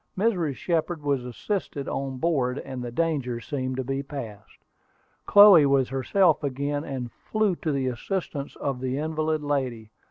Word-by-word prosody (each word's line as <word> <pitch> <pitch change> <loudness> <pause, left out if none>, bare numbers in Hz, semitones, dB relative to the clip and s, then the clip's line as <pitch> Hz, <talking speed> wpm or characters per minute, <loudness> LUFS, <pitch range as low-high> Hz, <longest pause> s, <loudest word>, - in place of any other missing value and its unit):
Mrs. 180 - +1
Shepard 165 -1 -1
was 140 -3 0
assisted 140 - -4
on 135 -1 -3
board, 135 -4 0
and 130 -3 -6
the 120 - -4
danger 135 -4 -1
seemed 130 +2 -3
to 130 - -1
be 135 +2 -2
passed. 135 -8 -8 0.7
Chloe 200 -8 +8
was 135 -2 +2
herself 150 +5 +2
again, 140 +1 -2
and 130 -5 -5
flew 215 - -1
to 155 - -2
the 135 -2 -1
assistance 140 - -3
of 135 -3 -3
the 130 +1 -2
invalid 155 0 -1
lady. 130 -7 -2
140 Hz, 155 wpm, -26 LUFS, 130-160 Hz, 0.7 s, Chloe